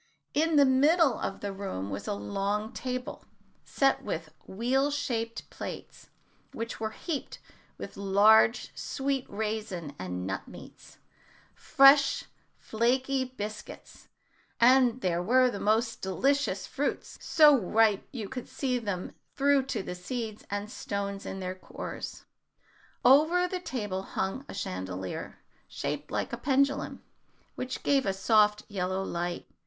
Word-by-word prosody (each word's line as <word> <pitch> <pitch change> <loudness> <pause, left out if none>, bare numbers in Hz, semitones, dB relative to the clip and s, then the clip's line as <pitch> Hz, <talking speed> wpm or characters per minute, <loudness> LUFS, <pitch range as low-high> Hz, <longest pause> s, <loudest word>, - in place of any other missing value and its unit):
In 320 +2 +2
the 285 -1 +7
middle 285 +3 +4
of 195 - -4
the 200 -1 -3
room 145 - -5
was 100 +1 -5
a - - -1
long 200 - -2
table, 255 -1 -5 0.4
set 275 -1 +1
with - - -5
wheel 255 +8 +1
shaped 230 -6 -3
plates, - - -8 0.4
which 230 +1 -5
were 220 0 -2
heaped 290 +5 -5 0.4
with - - -8
large 210 +4 +4
sweet 270 -1 -2
raisins 210 -7 -4
and 90 0 -4
nut 95 +1 -4
meats, - - -13 0.6
fresh 275 +1 +5 0.3
flaky 260 +4 0
biscuits, 215 -4 -8 0.5
and 250 0 +5
there 175 -3 0
were 250 +6 +4
the 200 - -5
most 225 +3 +1
delicious 275 +9 0
fruits, - - -3
so 300 -3 +6
ripe 220 -2 +2
you 225 -6 -5
could 250 +3 -7
see 250 -3 -2 0.5
through 280 0 +4
to 220 -7 -2
the - - -5
seeds 215 +4 -5
and 205 +1 -4
stones 200 -4 -4
in 190 - -5
their 185 0 -3
cores. 185 - -8 0.8
Over 315 +7 +5
the 365 0 -3
table 210 - -3
hung 195 +7 -3
a - - -7
chandelier, 95 - -5 0.2
shaped - - -4
like - - -3
a - - -2
pendulum, 275 +1 0 0.5
which 255 0 -5
gave 275 -5 +2
a 195 - +1
soft 210 +1 +3
yellow 190 -1 -2
light. 175 -1 -3
220 Hz, 130 wpm, -29 LUFS, 195-265 Hz, 0.8 s, the